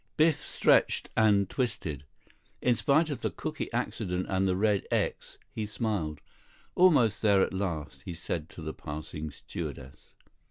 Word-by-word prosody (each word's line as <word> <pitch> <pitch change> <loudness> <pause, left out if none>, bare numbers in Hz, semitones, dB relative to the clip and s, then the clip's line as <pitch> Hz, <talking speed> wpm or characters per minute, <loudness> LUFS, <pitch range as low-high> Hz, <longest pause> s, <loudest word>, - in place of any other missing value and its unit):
Biff 155 0 +4
stretched - - +2
and 105 -3 +4
twisted. 95 - -2 0.5
In 125 -1 +3
spite 155 +6 +3
of 140 - -4
the - - 0
cooky - - -5
accident 90 0 -2
and 95 0 +1
the 90 - +2
red 100 0 +1
"X," - - -1 0.2
he 110 -1 -3
smiled. 105 - -2 0.5
"Almost 145 - +4
there, 100 -3 +5
at - - -2
last," 80 -8 -3
he 90 - -6
said 80 -1 -4
to 85 - -10
the 80 - -4
passing 75 +1 -6
stewardess. 65 -2 -8
95 Hz, 150 wpm, -29 LUFS, 80-110 Hz, 0.5 s, there